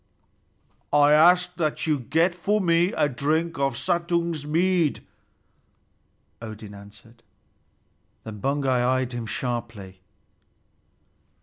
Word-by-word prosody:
"I 145 0 +5
ask 180 +4 +5
that 155 -4 -1
you 155 -3 +1
get 165 +8 +1
for 200 +4 0
me 170 0 +2
a - - +2
drink 155 +4 -1
of 135 -3 0
Suttung's 170 -3 -1
mead," 170 0 +1 1.4
Odin 110 -2 -9
answered. 105 +3 -16 1.0
Then 110 -2 -8
Baugi 140 +3 -1
eyed 130 0 +1
him 120 -2 -5
sharply. 115 -7 -5
145 Hz, 100 wpm, -24 LUFS, 120-170 Hz, 1.4 s, I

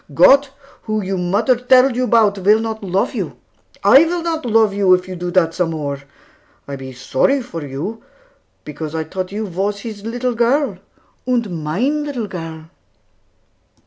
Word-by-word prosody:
Gott, 280 0 +6 0.3
who 215 -1 -2
you 190 +1 -2
mutter 195 +8 +1
telled 255 +1 +4
you 250 0 0
'bout, 215 -4 +3
will 205 +3 +4
not 220 -1 -4
love 190 0 0
you. - - -4 0.5
I 275 - +7
will 345 0 -2
not 320 -5 -2
love 220 -2 +3
you, 195 -2 +4
if 180 0 -5
you 185 - -6
do 175 0 -4
dat 175 -2 +2
some 180 -2 0
more. 145 -3 -4 0.7
I 140 - -5
be 135 -1 -8
sorry 130 - +1
for 170 -10 -7
you, 145 +12 -5 0.6
because 150 +1 -6
I 160 - -1
tought 185 +4 -5
you 215 +2 -3
vas 200 +2 -3
His 215 -3 -8
little 245 +2 -2
girl, 240 -3 +1 0.5
and 220 -10 -1
mine 255 - 0
little 275 -6 -4
girl." 165 -4 -8
205 Hz, 170 wpm, -18 LUFS, 175-240 Hz, 0.7 s, I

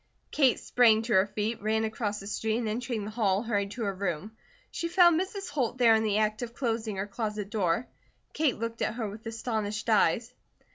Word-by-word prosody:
Kate 270 -4 +3
sprang 225 -3 +4
to 230 0 -1
her 190 +1 +5
feet, 215 +2 -3
ran 220 +1 +1
across 215 -1 -2
the 195 - -10
street, 220 +2 -1
and 235 -2 -2
entering 225 -1 -3
the 215 - -6
hall, 210 -2 +1
hurried 205 -4 -1
to 230 +3 -5
her 200 -2 -1
room. 185 +1 -3 0.4
She 335 - -3
found 345 -1 +5
Mrs. 390 0 -5
Holt 255 -4 -1
there 235 -3 +6
in 220 - +3
the 210 -2 +1
act 215 +1 0
of 235 -1 -6
closing 225 -4 -2
her 195 +1 -2
closet 210 -1 -4
door. 195 +1 0 0.5
Kate 300 -5 +1
looked 230 +1 -4
at - - 0
her 230 -3 -2
with 210 +3 -9
astonished 220 -1 -3
eyes. 225 +4 +2
220 Hz, 205 wpm, -28 LUFS, 210-240 Hz, 0.5 s, there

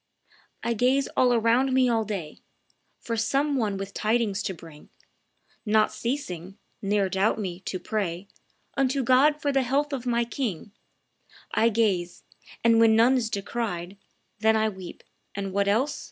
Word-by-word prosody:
"I 235 - 0
gaze 255 +4 +2
all 250 -1 +4
around 240 +3 +2
me 260 -1 +4
all 230 -2 +1
day 190 -8 -5 0.6
For 230 - -4
some 275 +6 +1
one 215 -6 0
with 195 0 -6
tidings 215 -2 0
to 195 - -3
bring, 160 -3 -14 0.7
Not 215 -1 +2
ceasing 195 - -4 0.2
ne'er 200 0 +1
doubt 190 +3 +1
me 185 -5 -4
to 190 0 -4
pray 190 -2 -3 0.5
Unto 270 0 +1
God 275 +5 +4
for 285 - 0
the 270 -1 +2
health 280 +4 0
of 255 -2 -4
my 235 -1 +1
king 230 - -4 0.8
I 230 - +4
gaze; 200 -6 0 0.4
and 230 -1 +5
when 225 -1 +6
none 235 +4 +5
is 235 -3 0
descried, 200 -3 -4 0.4
Then 220 +1 +3
I 220 0 +2
weep; 190 -3 -10 0.3
and, 195 -1 -4
what 200 0 +1
else? 245 +8 +1
220 Hz, 155 wpm, -26 LUFS, 195-250 Hz, 0.8 s, when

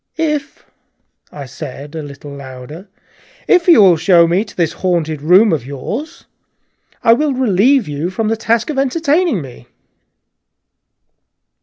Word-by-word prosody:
"If," 300 -3 -3 0.7
I 145 -2 -8
said, 140 +3 -9
a 160 - -5
little 145 0 -10
louder, 140 +6 -10 0.6
"if 360 -1 +3
you 325 - +7
will 180 -4 +5
show 170 +1 +4
me 175 +5 +1
to 205 - -15
this 170 -3 0
haunted 165 -5 -2
room 180 +6 +4
of 145 -7 -2
yours, 215 - -7 0.8
I 230 - +6
will 290 +3 0
relieve 250 - +2
you 150 +4 -3
from 215 +4 -3
the 225 - 0
task 230 +4 -1
of 275 - -2
entertaining 300 - 0
me." 120 -2 -13
185 Hz, 140 wpm, -16 LUFS, -, 0.8 s, you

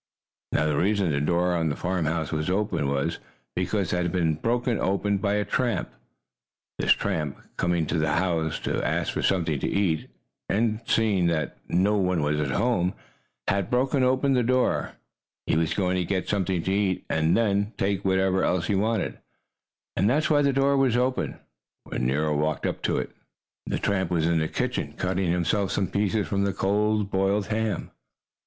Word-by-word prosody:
Now 80 - +2
the 75 -1 +1
reason 100 -2 +2
the 70 0 0
door 90 +3 +1
of 80 -2 +1
the 70 - -2
farmhouse 80 -3 -1
was 75 +1 -1
open 95 -6 0
was 70 0 -1 0.4
because 95 +1 -1
it - - +1
had 90 -1 -1
been 85 -3 +1
broken 120 - 0
open 100 +1 0
by 100 0 0
a 105 0 0
tramp! 115 -1 -1 0.9
This - - +3
tramp, 80 -8 -3 0.2
coming 85 -2 +1
to 80 +2 -1
the 80 0 +1
house 85 -3 0
to - - -1
ask - - 0
for - - -2
something 80 -6 +1
to - - -1
eat 90 -6 0 0.4
and 110 +1 +1
seeing 100 -6 +2
that 80 -3 -1
no 100 +4 +2
one 90 -5 +1
was 75 +1 0
at 75 -2 -1
home, 90 - +1 0.5
had 100 -2 0
broken 130 +2 +1
open 130 +2 +2
the 125 - +3
door. 130 +2 +1 0.5
He - - +1
was 80 0 +1
going 95 -2 +1
to 90 - +1
get 95 +1 -2
something 95 -4 0
to 95 - 0
eat, 100 -2 0
and 80 +1 +2
then 100 -1 +1
take 100 0 0
whatever 95 0 +2
else 90 -1 +1
he 105 - 0
wanted. 110 +2 0 0.8
And 100 +4 +2
that's 150 +5 +1
why 145 -1 +5
the 140 -1 +3
door 135 +1 +2
was 130 -3 +3
open 130 +1 0 0.5
when - - -2
Nero 75 +3 +1
walked 75 +1 -1
up - - -2
to - - +1
it. - - -3 0.6
The - - -1
tramp 95 -3 0
was 85 -3 +1
in 85 -1 +2
the 80 - 0
kitchen, - - -2
cutting 90 0 -1
himself 90 +3 +1
some 95 - -1
pieces 105 0 0
from 100 -1 0
the 100 -1 0
cold, 105 +1 +1
boiled 100 +1 +1
ham. 110 -1 -2
95 Hz, 185 wpm, -26 LUFS, 85-105 Hz, 0.9 s, why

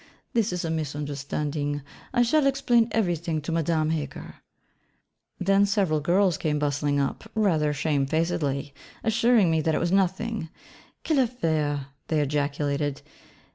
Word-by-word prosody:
'This 225 -5 +1
is 180 -1 -2
a 165 - -1
misunderstanding: 145 -1 -3 0.3
I 245 -1 +3
shall 275 +4 +3
explain 245 -4 +3
everything 170 -6 0
to 155 - -4
Madame 160 -1 +1
Heger.' 145 -4 -5 1.0
Then 195 +2 +3
several 195 -7 +1
girls 175 +3 +2
came 150 -1 0
bustling 145 0 0
up, 140 +10 -2
rather 165 -9 +2
shamefacedly, 145 -1 0 0.3
assuring 225 -4 +3
me 160 -1 +2
that 160 0 +1
it - - +1
was 170 - 0
nothing: 195 0 0 0.6
'Quelle 310 -4 +2
affaire,' 155 - -1 0.2
they 155 - +1
ejaculated. 145 0 -1
160 Hz, 130 wpm, -26 LUFS, 145-195 Hz, 1.0 s, I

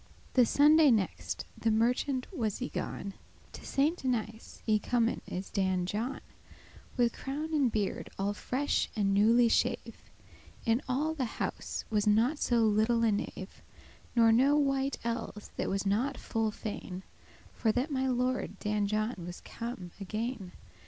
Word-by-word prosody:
The 250 -3 +5
Sunday 300 +3 +6
next* 215 -6 0
the 230 - 0
merchant 250 +4 +1
was 220 - -1
y 255 - -4
gone, 200 - -4 0.3
*after - - -12
To - - -11
Saint 300 +6 +1
Denis 225 -3 -3
y 215 -1 +4
comen 235 0 +1
is 185 +2 -5
Dan 190 -2 +1
John, 225 +8 -3 0.8
With 240 -2 +3
crown 300 +4 -4
and 275 -6 +3
beard 210 -3 -2
all 200 +1 0
fresh 265 +7 -1
and 200 -2 +1
newly 230 +4 +5
shave, 225 - 0 0.6
In 230 +3 +2
all 295 +5 +1
the 280 -5 -1
house - - -3
was 210 -1 +1
not 230 +8 +3
so 240 -2 +2
little 220 +2 +3
a 225 - +4
knave,* 205 - -1
*servant 190 0 -8
boy - - -25 0.3
Nor 230 -1 +6
no 265 +6 +5
wight 275 -1 +1
elles 230 -3 -4
that - - -1
was 195 +1 -1
not 225 +8 +1
full 225 -1 -1
fain 205 -3 -6 0.5
For 220 - +1
that 250 +7 -1
my 265 -1 0
lord 255 0 -1
Dan 210 -1 0
John 215 +3 0
was 175 - -7
come 230 -7 -6
again. 215 0 -4
230 Hz, 160 wpm, -31 LUFS, 210-260 Hz, 0.8 s, Sunday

